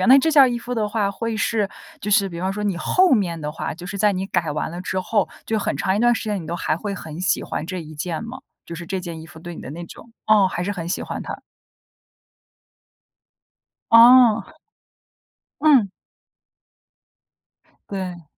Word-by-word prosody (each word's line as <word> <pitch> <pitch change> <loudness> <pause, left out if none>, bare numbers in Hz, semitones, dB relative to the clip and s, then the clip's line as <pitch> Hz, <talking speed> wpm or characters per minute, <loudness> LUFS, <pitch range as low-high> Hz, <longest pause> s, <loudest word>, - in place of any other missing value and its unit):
样， 185 - +1
那 270 +2 +9
这 320 +4 +2
件 295 -3 +7
儿 260 - +6
衣 240 -1 -2
服 245 +1 -5
的 215 -2 0
话 205 -2 0
会 230 +2 -3
是 215 -2 0 0.3
就 210 - -4
是 200 0 +4
比 170 0 -6
方 190 +1 -1
说 210 +1 -4
你 200 - 0
后 370 - +3
面 180 -8 +1
的 150 -1 -5
话 - - -4
就 175 +2 -11
是 200 +1 -5
在 210 -1 +3
你 185 - -2
改 170 -5 -1
完 150 +2 -3
了 175 +1 -6
之 185 0 -3
后， 205 +1 0 0.2
就 220 - -1
很 - - -2
长 190 - 0
一 205 - 0
段 240 +1 +4
时 - - -4
间， 205 -4 -2
你 - - -10
都 170 - -3
还 155 - 0
会 200 +5 -4
很 160 -2 -8
喜 185 - +1
欢 160 - -4
这 185 -2 -5
一 155 0 -11
件 165 +5 -4
吗？ 240 +3 -7 0.3
就 170 - -8
是 170 0 -8
这 190 +1 -2
件 170 -3 -7
衣 160 - -11
服 160 0 -14
对 170 +1 -8
你 - - -9
的 - - -9
那 170 +2 -7
种 230 - -13 0.2
哦， 210 -3 +5
还 175 0 -3
是 205 - -1
很 170 -4 -5
喜 175 - -2
欢 - - -5
它。 - - -5 2.6
哦。 230 -1 +7 1.1
嗯。 275 -9 +5 2.0
对。 180 -4 -5
195 Hz, 225 characters per minute, -22 LUFS, 170-225 Hz, 2.6 s, 那